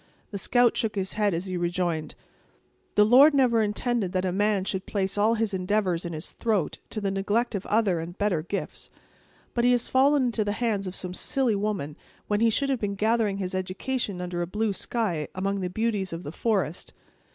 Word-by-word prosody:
The 200 - -4
scout 245 +3 +3
shook 220 -2 -1
his 195 -1 -2
head 210 -1 +1
as 170 +3 -3
he 185 -1 -4
rejoined: 175 -2 -1 0.8
"The 210 - +6
Lord 275 +7 +7
never 245 -4 +4
intended 215 -1 -1
that 185 - +1
the 185 - 0
man 205 +1 +1
should 190 -1 -3
place 195 -2 -1
all 215 +3 +3
his 220 -2 -1
endeavors 185 -2 0
in 170 - -4
his 155 +2 -5
throat, 210 -8 -1
to 215 - -3
the 200 -2 -1
neglect 205 +5 0
of 200 -2 -4
other 205 -5 +2
and 170 +2 -7
better 205 -6 +1
gifts! 195 +5 -5 0.6
But 235 - 0
he 245 - +5
has 245 -1 0
fallen 275 +2 +4
into 230 -3 0
the 205 0 -1
hands 210 -4 -1
of 185 - -5
some 180 -1 -5
silly 255 +4 +1
woman, 200 -8 -2 0.3
when 205 0 +1
he 230 +1 +4
should 275 +5 +1
have 260 - 0
been 200 -2 -2
gathering 215 -1 +1
his 185 -2 -4
education 185 +2 -3
under 175 -1 -3
a 175 - -2
blue 210 +3 -1
sky, 190 -8 -2
among 195 +1 -1
the 180 - -2
beauties 205 -2 -1
of 165 +2 -6
the 145 - -6
forest. 190 -4 -1
205 Hz, 210 wpm, -26 LUFS, 185-225 Hz, 0.8 s, Lord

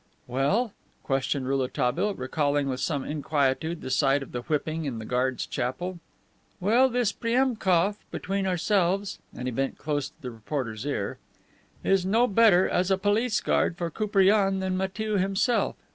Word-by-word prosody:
"Well?" 190 - 0 0.3
questioned 135 -1 -1
Rouletabille, 135 +8 0
recalling 145 +2 0
with 130 -1 -2
some 140 0 -1
inquietude 150 +2 -1
the 130 - -5
sight 140 0 +3
of - - -12
the 120 - -4
whipping 155 +3 -2
in 130 -5 -3
the 110 - -6
guards' 125 +2 0
chapel. 145 +8 -3 0.6
"Well, 235 +8 +4
this 245 -3 +1
Priemkof, 220 -6 +1
between 195 0 -2
ourselves," 190 +2 +1 0.2
(and 125 - -4
he - - -1
bent 135 +3 -2
close 145 -2 -2
to - - -34
the 125 -2 -6
reporter's 115 0 -4
ear) 105 -9 -3 0.6
"is 195 -1 +3
no 220 +6 +3
better, 205 -4 +5
as 180 +1 +1
a 190 - +3
police 210 +4 +1
guard 170 - +1
for 170 -1 -3
Koupriane 195 0 +3
than 190 -1 -1
Matiew 200 +2 -1
himself. 195 +5 +1
175 Hz, 155 wpm, -27 LUFS, 135-200 Hz, 0.6 s, better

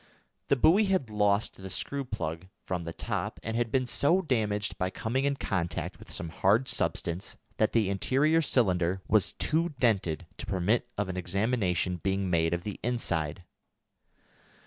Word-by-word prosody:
The - - +4
buoy 175 - +5
had 185 - 0
lost 105 0 +1
the 95 0 -8
screw 140 +8 -2
plug 95 -8 -4 0.2
from 90 -2 -3
the 85 - -4
top, - - -3
and 110 +1 -3
had 115 -1 0
been 130 +1 +2
so 145 +8 +3
damaged 105 -7 0
by 90 - +1
coming 125 +7 -1
in 140 0 +1
contact 95 -10 -3
with - - -13
some 85 - -3
hard 105 +10 +2
substance 85 +3 -1 0.2
that 110 - +2
the 110 -4 +3
interior 135 +11 +2
cylinder 95 - +2
was 105 -2 +3
too 160 0 0
dented 95 -8 +1
to - - -6
permit 100 +6 +1
of 105 -2 0
an 95 -1 -4
examination 90 -1 0
being 95 +1 -1
made 80 -1 +2
of 85 0 -1
the 105 0 -5
inside. 90 -9 -1
105 Hz, 165 wpm, -29 LUFS, 90-125 Hz, 0.2 s, buoy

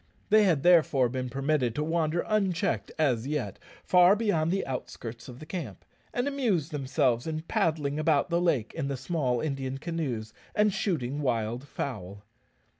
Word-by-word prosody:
They 215 0 +6
had 160 -7 +2
therefore 155 -8 +5
been 130 0 -3
permitted 135 -2 0
to 150 - 0
wander 165 +1 0
unchecked, 195 -3 0
as 130 -6 +1
yet, 140 -10 -3 0.2
far 180 +2 +6
beyond 200 -8 +1
the 195 +3 0
outskirts 120 -2 -6
of 125 - -9
the 155 - -10
camp, 155 - -6 0.3
and 245 +3 -1
amuse 230 - 0
themselves 130 -3 0
in 155 0 -3
paddling 155 -3 0
about 155 +1 +2
the 170 +1 +2
lake 150 -11 +1
in 155 -4 -3
the 140 -1 -2
small 130 -4 -1
Indian 135 -3 -3
canoes 135 -9 -3 0.2
and 210 -1 +3
shooting 145 - -1
wild 120 0 -1
fowl. 100 -9 -5
150 Hz, 160 wpm, -28 LUFS, 125-170 Hz, 0.3 s, They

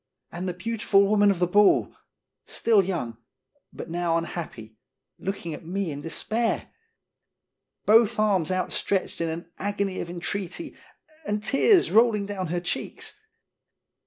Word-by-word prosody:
And 180 +2 -5
the - - -3
beautiful 200 0 +2
woman 205 0 +4
of 195 - +2
the 180 - +2
ball! 205 +3 +4 0.5
Still 220 -4 +3
young, 145 - -3 0.5
but - - -8
now 170 0 0
unhappy, 120 -10 -6 0.4
looking 185 -4 -4
at 150 - -8
me 185 +1 -2
in 145 0 -6
despair. 220 +8 -1 1.2
Both 225 +1 +5
arms 195 -6 +2
outstretched 185 0 -1
in 165 - 0
an 170 +1 -6
agony 200 -1 -2
of 170 - -4
entreaty, 185 - -4 0.5
and 210 0 -1
tears 345 - +4
rolling 220 -2 +4
down 195 -3 -4
her 175 +2 -1
cheeks. 175 - -4
190 Hz, 130 wpm, -26 LUFS, 170-210 Hz, 1.2 s, Both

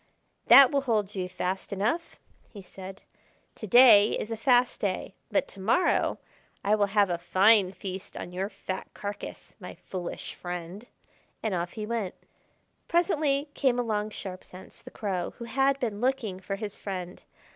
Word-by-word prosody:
"That 275 -2 +9
will 280 - +2
hold 215 -6 0
you 185 -2 -3
fast 185 +1 -3
enough," 220 - -2 0.3
he 200 -3 -11
said. 190 +1 -11 0.5
"To 215 - -8
day 220 -2 +7
is 215 - -5
a - - -1
fast 245 +2 +2
day, 190 -1 -2 0.2
but 285 -1 +1
to 200 - -13
morrow 235 - +2 0.5
I 205 - +3
will 205 -1 +3
have 200 -2 +2
a 170 - -1
fine 190 +3 +4
feast 190 -1 -7
on - - -6
your 190 +2 -3
fat 190 -2 -6
carcass, 205 0 -7
my - - -9
foolish 180 -2 -6
friend." 180 +5 -7 0.6
And 220 -3 -1
off 175 -1 -2
he 215 -2 -5
went. 215 -4 -3 0.7
Presently 305 -5 +1
came 260 -3 +1
along 215 -3 -1
Sharp 185 -3 -7
Sense, 185 +1 -13
the - - -11
Crow, 190 -5 -3
who 235 - -7
had 270 +3 +1
been 220 -5 -3
looking 245 -7 -1
for 195 +1 -4
his 205 0 -6
friend. 185 -2 -6
205 Hz, 165 wpm, -28 LUFS, 185-240 Hz, 0.7 s, That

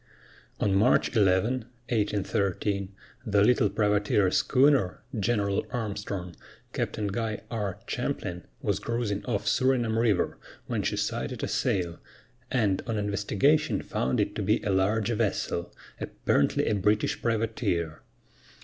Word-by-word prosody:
On 100 - +2
March 105 +5 +3
11, 110 +4 +3 0.2
1813, 100 -2 0 0.3
the 105 -4 +3
little 125 -1 +4
privateer 105 -1 +2
schooner, 130 -8 +3 0.2
General 100 -2 +1
Armstrong, 100 -7 -4 0.4
Captain 105 - -2
Guy 110 +1 -2
R. 105 -5 -2
Champlin, 90 -1 -3 0.2
was - - 0
cruising 115 -4 -2
off 105 -3 -1
Surinam 120 -1 +2
River, 110 -6 +1 0.3
when - - -1
she - - -1
sighted - - -2
a - - 0
sail, 85 -3 -1 0.5
and 105 -7 +1
on 115 -2 -1
investigation 105 +9 +1
found 65 - -1
it - - 0
to - - -3
be - - +2
a 100 - 0
large 105 +4 +2
vessel, 95 -5 -1 0.3
apparently 70 - +1
a - - +1
British 105 +1 +1
privateer. 105 -8 -1
105 Hz, 120 wpm, -28 LUFS, 100-115 Hz, 0.5 s, little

